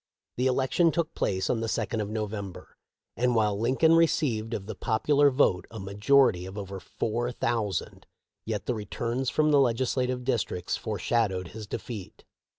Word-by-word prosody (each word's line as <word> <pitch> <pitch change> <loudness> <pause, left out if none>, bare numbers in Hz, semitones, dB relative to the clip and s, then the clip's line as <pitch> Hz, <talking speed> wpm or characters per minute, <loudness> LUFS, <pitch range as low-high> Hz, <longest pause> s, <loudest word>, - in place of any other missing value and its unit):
The 125 +2 +2
election 135 +6 +2
took 170 -1 -1
place 95 -1 -1
on 120 - 0
the 115 - -2
second 110 0 -1
of 105 - -3
November, 105 -3 -5 0.4
and 125 0 +1
while 105 -2 +2
Lincoln 130 +8 +3
received 130 -9 +2
of 95 - -5
the 110 - -5
popular 140 +7 +3
vote 115 - +2
a 115 - -8
majority 100 0 +3
of 95 +2 -9
over 100 -1 -6
four 120 +6 -2
thou 115 -3 0
sand, 95 - -5 0.4
yet 105 -4 -3
the 125 - 0
returns 115 +4 -2
from 155 0 +2
the 145 - +5
legislative 125 0 +1
districts 115 -8 -1
foreshadowed 105 -3 -1
his 110 -1 -8
defeat. 105 -3 -7
115 Hz, 160 wpm, -28 LUFS, 105-130 Hz, 0.4 s, the